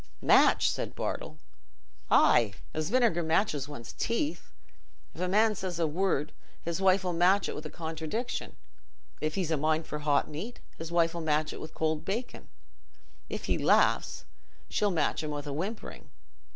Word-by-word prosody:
"Match!" - - +5
said - - -4
Bartle. - - -4 0.7
"Aye, 110 -4 +5 0.2
as 155 0 -2
vinegar 235 -9 +3
matches 160 -4 +1
one's 120 -6 -8
teeth. 290 +7 -2 0.6
If - - -8
a 185 - +1
man 215 +4 +4
says 185 -3 -4
a 170 - +2
word, 160 -2 0 0.3
his 170 +3 -3
wife 190 0 +4
'll 180 - 0
match 180 +4 +4
it - - -3
with 155 +1 -6
a - - -11
contradiction; 165 +10 -4 0.7
if 155 0 -1
he's 180 -4 -1
a 160 - +2
mind 155 +2 +1
for 150 - -5
hot 145 -1 +2
meat, 185 +11 -7 0.2
his 165 +1 -7
wife 170 -1 +3
'll 170 - -4
match 155 -1 0
it - - -8
with 155 - -9
cold 155 -1 0
bacon; 230 +6 -4 0.8
if - - -4
he - - 0
laughs, - - +2 0.4
she'll 210 - +1
match 160 -6 0
him 155 - -4
with 145 -1 -4
whimpering. 175 +10 -5
165 Hz, 165 wpm, -29 LUFS, 155-195 Hz, 0.8 s, Match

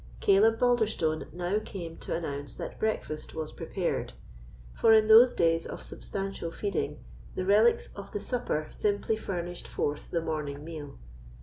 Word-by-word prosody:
Caleb 215 +3 +5
Balderstone 220 -10 +1
now 180 +4 -1
came 170 -4 -7
to - - -4
announce 145 -4 -4
that - - -7
breakfast 185 -8 -2
was 155 -1 -4
prepared; - - -3 0.6
for 225 - +5
in 215 0 +5
those 230 +3 +8
days 165 -1 +2
of - - -7
substantial 195 -3 -4
feeding, 200 +2 -3 0.3
the 185 - -2
relics 215 +4 +4
of 200 -1 -9
the 205 - -3
supper 205 -9 -2
simply 210 +1 0
furnished 175 -4 -4
forth 145 0 -3
the 170 - 0
morning 150 -3 -3
meal. 155 -3 -8
185 Hz, 145 wpm, -29 LUFS, 160-215 Hz, 0.6 s, those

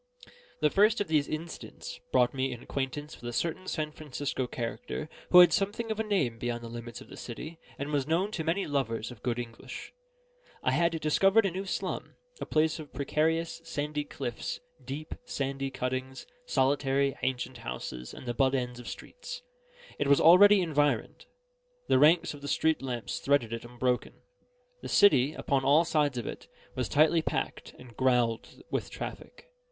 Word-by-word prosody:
The 150 -1 +4
first 215 +3 +4
of 205 -5 -2
these 150 -3 +2
incidents 160 +2 -6
brought 125 -1 +4
me 135 0 -1
in 120 -1 -7
acquaintance 140 +3 -4
with 120 - -5
a - - -6
certain 170 +7 -2
San 155 -3 -2
Francisco 145 -3 -3
character, 125 - -4 0.2
who 180 - +10
had 175 - +7
something 215 +3 0
of 220 - -3
a - - +2
name 160 - 0
beyond 120 0 -3
the 115 - -7
limits 120 0 -7
of - - -12
the - - -11
city, 155 +7 -7 0.2
and 140 +2 -4
was 145 -2 0
known 180 +6 +1
to 170 -6 -3
many 170 +5 0
lovers 125 -5 -1
of 120 - -12
good 120 -1 -1
English. 115 -2 -7 0.7
I - - +2
had 170 -1 +2
discovered 195 +8 +4
a 195 - +1
new 190 +3 -4
slum, 190 - -3 0.2
a - - -5
place 155 +1 +2
of 150 -2 -9
precarious, 160 +5 0
sandy 150 -2 -3
cliffs, - - -5 0.2
deep, 150 +3 -6
sandy 135 - -2
cuttings, 130 0 -4 0.2
solitary, 135 0 +2
ancient 130 0 -2
houses, 60 0 -6
and - - -10
the 120 - -2
butt 135 +2 +2
ends 125 -1 -2
of 125 - -10
streets. - - -8 0.6
It 145 - +1
was 140 0 +5
already 195 +5 +8
environed. 145 -3 0 0.6
The - - +5
ranks 160 +4 +5
of 145 - -11
the 145 - -6
street 160 +2 +2
lamps 125 -3 -3
threaded 135 -5 +2
it 115 - -4
unbroken. 125 +1 -1 0.7
The - - -6
city, 145 -6 +5
upon 135 -1 0
all 145 +5 +5
sides 150 -5 +1
of 120 - -3
it, - - -7 0.3
was 125 -5 -2
tightly 160 +5 +4
packed, - - -3
and 125 -2 -14
growled 125 -3 +1
with - - -1
traffic. - - -8
145 Hz, 175 wpm, -29 LUFS, 125-165 Hz, 0.7 s, who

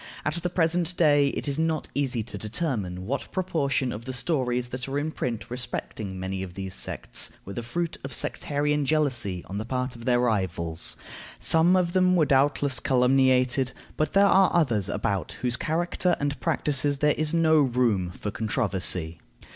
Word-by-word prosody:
At 155 - 0
the 180 - -1
present 175 0 0
day 145 -3 +4
it 140 - -3
is 140 +1 -1
not 160 -1 0
easy 130 -5 -1
to 120 - -9
determine 105 - -3
what 135 +7 -3
proportion 140 -8 0
of 110 +3 -7
the 130 - -4
stories 125 -3 0
that 125 +1 -5
are 135 +1 -2
in 150 +2 -1
print 115 -7 -3
respecting 110 -5 -5
many 95 0 -3
of 90 -2 -7
these 95 -1 -5
sects - - -1 0.2
were 100 - -7
the 120 - -4
fruit 165 +9 -3
of 135 - -6
sectarian 150 +3 0
jealousy 130 - 0
on 100 +2 -5
the - - -3
part 125 +2 -3
of 115 0 -10
their 125 -1 +3
rivals; 90 -8 -1 0.4
some 165 +3 +4
of 175 -2 +1
them 185 -1 +4
were 165 -3 +4
doubtless 140 -1 +2
calumniated, 130 0 +3 0.2
but 155 - -1
there 200 +1 +6
are 195 -1 +5
others 115 - +2
about 95 -6 -2
whose 125 -2 +1
character 175 +5 0
and 145 0 -2
practices 145 -3 +1
there 150 +1 +3
is 155 -1 -1
no 160 -1 +4
room 120 -9 +1
for 100 +4 -6
controversy. 95 -8 +1
130 Hz, 175 wpm, -26 LUFS, 110-155 Hz, 0.4 s, there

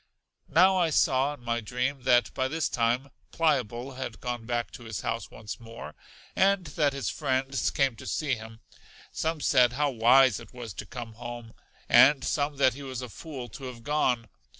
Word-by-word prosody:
Now 185 +5 +5
I 175 -3 +3
saw 145 -2 +2
in 125 - -20
my 120 0 -1
dream 125 +5 -2
that 120 0 +4
by 130 -1 0
this 160 +3 -1
time 120 +3 0 0.2
Pliable 130 -5 0
had 120 -5 -5
gone 120 -1 -4
back 120 -1 -2
to 120 - -11
his 110 -3 -5
house 115 -2 -3
once 110 -1 -8
more, 115 -9 -9 0.4
and 195 -1 +3
that 145 -1 +1
his 140 -1 -2
friends 135 +1 0
came 135 -3 +1
to - - -10
see 150 -4 -1
him: 110 -1 -7 0.5
some 160 -1 -2
said 125 -3 +4
how 145 +2 +1
wise 125 0 +5
it - - -14
was 120 -5 -7
to 105 - -7
come 120 -1 -7
home, 120 0 -8 0.3
and 135 0 +6
some 145 +1 0
that 130 -2 +4
he 140 - -9
was 130 -2 -5
a 125 - -7
fool 135 0 -8
to 130 +5 -9
have 120 -2 -8
gone. 130 -5 +1
130 Hz, 190 wpm, -28 LUFS, 120-140 Hz, 0.5 s, and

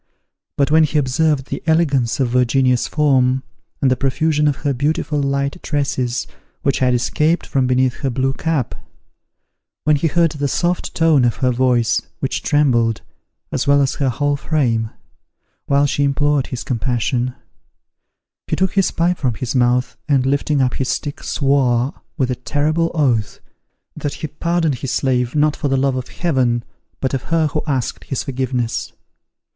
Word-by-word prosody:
But 140 0 +2
when 160 +1 +6
he 155 0 +1
observed 145 0 +1
the - - -3
elegance 145 -8 +2
of 130 -3 +1
Virginia's 125 0 +2
form, 135 -3 +2 0.4
and 130 - +4
the - - +3
profusion 150 +3 +1
of 145 - +2
her 140 - +2
beautiful 145 +2 -1
light 140 +4 -1
tresses 130 -4 -1 0.4
which 140 - +1
had 125 -1 +3
escaped 150 +7 +1
from 130 -2 0
beneath 125 0 +1
her 135 - -2
blue 130 +2 0
cap; 155 -5 -1 1.1
when 150 0 +4
he 145 +3 +1
heard 165 +1 +2
the 145 -2 -2
soft 175 +5 -1
tone 160 -5 +4
of 120 -2 +2
her 130 -1 +1
voice, 125 -2 +2 0.2
which - - -2
trembled, 120 -6 +2 0.5
as 135 +1 -2
well 140 0 +5
as 135 -2 +1
her 135 -2 0
whole 145 +3 0
frame, 120 -7 0 0.8
while 140 +1 +3
she 145 0 0
implored 145 0 +1
his 125 - -5
compassion; 125 0 -1 1.1
he - - 0
took 190 -1 0
his 195 -2 +3
pipe 175 +1 0
from 125 -5 0
his 120 +2 -4
mouth, 125 0 +1
and 135 -3 +3
lifting 140 +1 +1
up 125 - 0
his 130 -2 -2
stick, 145 +3 -3
swore, 135 -1 +1 0.2
with 130 -2 0
a - - -1
terrible 150 +7 0
oath, 120 -9 +1 0.6
that 145 - -4
he - - -5
pardoned 165 -2 -1
his 135 - -4
slave, 125 0 0
not 150 0 +3
for - - -2
the 135 -1 +1
love 135 0 +1
of 130 -1 -4
Heaven, 130 -8 0 0.4
but 130 - -1
of 135 - -2
her 165 -1 +1
who 150 +1 -2
asked 130 -5 -2
his 135 - -3
forgiveness. 130 -3 -2
135 Hz, 165 wpm, -19 LUFS, 125-150 Hz, 1.1 s, when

